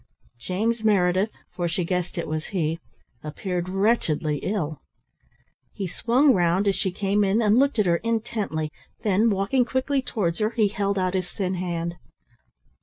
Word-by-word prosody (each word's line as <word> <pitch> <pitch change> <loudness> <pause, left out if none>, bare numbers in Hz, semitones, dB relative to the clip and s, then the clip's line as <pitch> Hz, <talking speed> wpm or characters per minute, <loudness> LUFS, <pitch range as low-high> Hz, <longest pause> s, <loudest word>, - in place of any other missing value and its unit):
James 220 - -1
Meredith, 190 -1 +3 0.2
for 175 -1 -1
she 175 +2 -1
guessed 180 0 -2
it 170 - -2
was 155 0 -3
he, 165 -4 -1 0.4
appeared 175 +3 -3
wretchedly 185 -7 +1
ill. 160 -7 -3 0.9
He 195 - -4
swung 245 - +3
round 180 +2 +2
as 195 - +3
she 190 - 0
came 200 +2 +1
in, 200 +3 +2
and 220 +1 +4
looked 275 -1 +2
at 210 - +3
her 170 -1 +3
intently, 215 -8 -2 0.3
then, 215 +1 +3
walking 200 +6 +2
quickly 260 +3 0
towards 195 -9 -2
her, 215 0 +2
he 220 -3 +2
held 200 -1 -1
out 185 -1 0
his 185 -2 -1
thin 190 -2 -2
hand. 170 -1 -3
195 Hz, 160 wpm, -25 LUFS, 175-220 Hz, 0.9 s, and